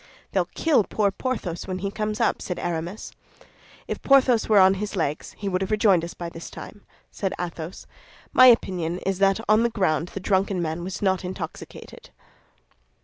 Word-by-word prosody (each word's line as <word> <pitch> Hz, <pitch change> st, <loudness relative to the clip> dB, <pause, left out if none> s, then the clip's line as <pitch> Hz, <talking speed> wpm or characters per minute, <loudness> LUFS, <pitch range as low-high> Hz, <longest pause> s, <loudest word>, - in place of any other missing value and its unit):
"They'll -, -, 0 dB
kill 310 Hz, -9 st, +3 dB
poor 200 Hz, 0 st, 0 dB
Porthos 200 Hz, -8 st, -4 dB
when 185 Hz, -1 st, -3 dB
he 195 Hz, +2 st, -3 dB
comes 215 Hz, 0 st, -3 dB
up," 230 Hz, -, +1 dB
said 180 Hz, -, -4 dB
Aramis. 175 Hz, +4 st, -4 dB, 0.8 s
"If -, -, -4 dB
Porthos 260 Hz, -5 st, +4 dB
were 215 Hz, -, +5 dB
on 190 Hz, 0 st, +7 dB
his 210 Hz, -1 st, -4 dB
legs, 155 Hz, -4 st, -3 dB
he 205 Hz, -, -5 dB
would 185 Hz, -1 st, -1 dB
have 195 Hz, -, -2 dB
rejoined 210 Hz, -5 st, +3 dB
us 170 Hz, -, -6 dB
by 170 Hz, -, -6 dB
this 165 Hz, 0 st, -9 dB
time," 205 Hz, -, -10 dB, 0.3 s
said 195 Hz, -2 st, -3 dB
Athos. 170 Hz, 0 st, -6 dB, 0.5 s
"My 255 Hz, -, +8 dB
opinion 180 Hz, -8 st, +3 dB
is 195 Hz, -1 st, -1 dB
that 195 Hz, +1 st, +3 dB
on 215 Hz, +2 st, +5 dB
the 235 Hz, -, +2 dB
ground 175 Hz, -7 st, 0 dB
the -, -, -2 dB
drunken 190 Hz, 0 st, 0 dB
man 165 Hz, 0 st, -3 dB
was 185 Hz, +3 st, -5 dB
not 190 Hz, -1 st, +1 dB
intoxicated." 180 Hz, -3 st, -8 dB
190 Hz, 180 wpm, -24 LUFS, 175-210 Hz, 0.8 s, My